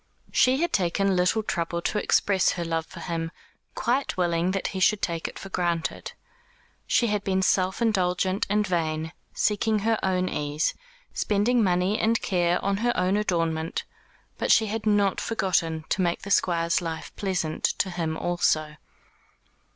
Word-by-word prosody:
She 260 +3 +3
had 345 - -1
taken 195 +2 +1
little 180 +5 +2
trouble 170 -3 -2
to 210 - 0
express 195 -2 +2
her 175 -2 -4
love 165 -1 -2
for - - -10
him, 165 -2 -3 0.5
quite 255 0 0
willing 175 -1 +1
that 190 0 -1
he 190 - -4
should 210 +2 +3
take 170 -4 -2
it - - -9
for 195 - -8
granted. 170 -3 -2 0.7
She 240 - +3
had 210 -2 0
been 190 -1 0
self 185 +3 +1
indulgent 190 -2 +1
and 210 +1 +2
vain; 160 -3 -1 0.2
seeking 210 0 +1
her 225 -1 +2
own 185 -1 0
ease, 150 -1 -1 0.4
spending 220 +3 +2
money 185 +2 +1
and 225 0 +2
care 175 -1 +1
on 200 0 +1
her 240 +3 0
own 185 +2 +2
adornment; 165 -5 -1 0.6
but - - +1
she 220 - +5
had 215 +1 -3
not 205 -2 +2
forgotten 165 -7 0
to 190 - +1
make 170 -1 0
the 200 - -6
Squire's 170 -2 +2
life 165 -2 -6
pleasant 180 -6 -2
to 190 - 0
him 165 -2 -2
also. 155 -4 0
185 Hz, 160 wpm, -26 LUFS, 170-205 Hz, 0.7 s, she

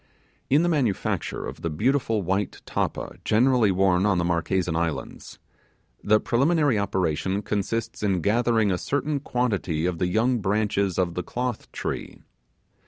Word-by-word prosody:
In 145 +5 +4
the - - +2
manufacture 135 - -1
of - - -7
the 85 - -2
beautiful 115 - 0
white 95 +3 -2
tappa - - -3
generally 120 -1 +3
worn 95 -1 +3
on 100 -3 +2
the 85 - +1
Marquesan 85 0 0
Islands, 85 -2 -4 0.7
the 105 +1 +4
preliminary 140 -1 +2
operation 95 0 -1
consists 110 +3 -2
in 95 -4 +1
gathering 110 +1 +2
a 90 - -1
certain 145 +1 -1
quantity 100 - -1
of 90 -2 -1
the 90 - +1
young 115 +6 +1
branches 100 -2 0
of 90 -2 +1
the 90 - -2
cloth 125 +5 -4
tree. - - -5
105 Hz, 145 wpm, -25 LUFS, 90-120 Hz, 0.7 s, In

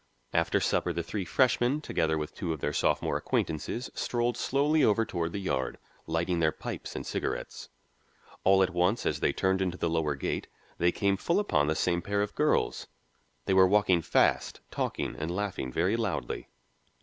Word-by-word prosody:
After - - +2
supper 90 - 0
the 85 0 -2
three 95 +3 -4
freshmen, 130 +3 +2
together 80 - 0
with 75 0 -4
two 85 -5 -3
of 80 - -6
their 75 - -2
sophomore - - +1
acquaintances, 80 - -2
strolled 120 -1 -1
slowly 145 +5 +2
over 115 +1 +3
toward 85 -5 -2
the - - -4
Yard, 95 -9 -2 0.3
lighting 85 +2 0
their 80 -1 +3
pipes - - -7
and - - -4
cigarettes. - - -4 0.7
All 95 0 +5
at 95 - 0
once, 90 +5 +1
as - - 0
they - - +2
turned 95 0 +1
into 90 -1 -1
the 85 - -1
lower 80 -3 0
gate, 70 - -3 0.3
they 85 +1 +4
came 100 +1 +1
full 170 - +1
upon 75 - +1
the 80 - +1
same 85 +1 +1
pair 100 +2 0
of 105 - -5
girls. - - +1 0.6
They 95 - +1
were 95 0 +7
walking 95 -3 +3
fast, - - +1
talking - - -2
and 75 +2 -4
laughing 90 -8 -3
very 90 - +1
loudly. 115 -1 -3
90 Hz, 180 wpm, -29 LUFS, 80-105 Hz, 0.7 s, were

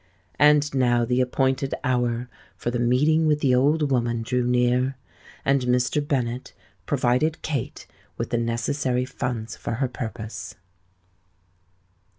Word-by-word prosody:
And 150 -1 +5
now 120 -3 +2
the 125 +1 +1
appointed 130 +1 0
hour 125 -1 0 0.3
for 120 - -2
the 120 - -2
meeting 150 +7 +3
with 150 -1 +2
the 130 -3 +3
old 145 +3 +2
woman 120 -2 0
drew 125 +2 0
near; 125 +2 +2 0.5
and 135 0 +3
Mr. 125 +3 +1
Bennet 125 -3 -2 0.3
provided 135 +6 +1
Kate 140 -7 -3 0.3
with - - -4
the 120 - +1
necessary 125 +2 -1
funds 120 -3 -4
for - - -5
her 130 +3 0
purpose. 110 -5 -6
125 Hz, 130 wpm, -24 LUFS, 120-135 Hz, 0.5 s, And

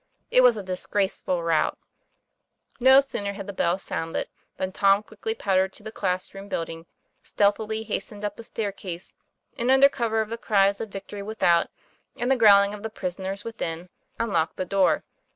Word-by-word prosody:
It 255 - +6
was 245 -3 +6
a 205 - -5
disgraceful 185 -1 -1
rout. 165 -2 +1 1.0
No 265 +2 +7
sooner 205 -7 -4
had 200 -1 -7
the 200 - -6
bell 175 -1 +1
sounded 165 -3 -4 0.3
than 190 0 -2
Tom 195 +1 +3
quickly 220 +1 -5
pattered 190 -2 +1
to 210 - -17
the 220 - -7
class 185 -3 -2
room 195 +1 -9
building, 165 -2 -4 0.3
stealthily 215 +2 0
has 205 -2 -2
tened 210 -1 -11
up 205 -1 -2
the 230 - -10
staircase, 195 -5 -5 0.5
and 240 +2 0
under 270 +1 +7
cover 230 -5 -1
of 220 -1 -1
the 230 - -4
cries 200 -3 +2
of 220 - -5
victory 200 +1 -7
without, 200 -5 +2 0.5
and 245 +2 0
the - - +5
growling 200 -4 +6
of 210 - -8
the 220 - -4
prisoners 190 0 -5
within, 180 -6 -5 0.3
unlocked 170 -8 0
the 185 - -3
door. 195 +1 +2
200 Hz, 175 wpm, -25 LUFS, 185-220 Hz, 1.0 s, No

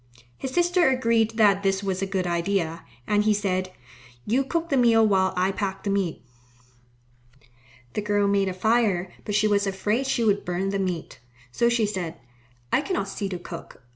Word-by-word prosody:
His 265 - -5
sister 350 +2 +3
agreed 230 -3 +1
that 200 -3 +4
this 195 0 0
was 190 -1 -2
a 195 - -1
good 190 -1 -1
idea, 170 -1 -1 0.2
and 210 +5 +2
he 215 0 +3
said, 185 -2 -1 0.5
"You 255 +5 +2
cook 335 +5 -2
the 275 - +2
meal 230 -3 +5
while 190 -2 +2
I 185 +2 +2
pack 195 -1 -4
the 200 - -1
meat." 190 - -1 1.7
The - - -1
girl 205 -1 +1
made 200 -1 +2
a - - -3
fire, 205 -4 +1
but 205 - -2
she 215 +1 +3
was 205 -1 +2
afraid 210 +7 -1
she 265 -3 +1
would 205 -2 +2
burn 180 +2 -2
the 200 0 -1
meat, 180 -4 -3 0.3
so 235 - +2
she 235 -2 +2
said, 185 -5 -4 0.6
"I - - +4
cannot 310 - -2
see 195 0 -4
to 185 - -4
cook. 170 -6 -10
200 Hz, 185 wpm, -25 LUFS, 190-225 Hz, 1.7 s, meal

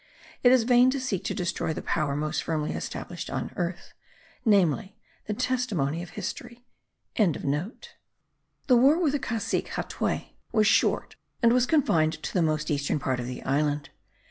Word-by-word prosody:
It 245 - +6
is 255 -2 +5
vain 245 +1 +5
to 275 +1 -1
seek 245 -9 -2
to - - -2
destroy 175 -3 -1
the - - -5
power 150 -3 0
most 150 +1 -1
firmly 155 -2 -2
established - - -5
on - - -4
earth, 175 0 -4 0.5
namely, 200 - +2 0.3
the 210 - -2
testimony 215 - -1
of 175 - -10
history.) 240 +4 -6 0.5
The 190 -8 +2 1.3
war 265 +6 +6
with 325 -6 +2
the 290 - -1
Cacique 230 -4 -2
Hatuey - - -3
was 215 -2 +3
short 215 - +2 0.3
and 235 0 +6
was 250 0 +3
confined 165 - +3
to - - -4
the 180 - +2
most 155 -1 0
eastern 145 0 0
part 130 -2 -1
of 120 - -4
the 125 - -6
island. 145 +2 0
195 Hz, 160 wpm, -27 LUFS, 155-245 Hz, 1.3 s, It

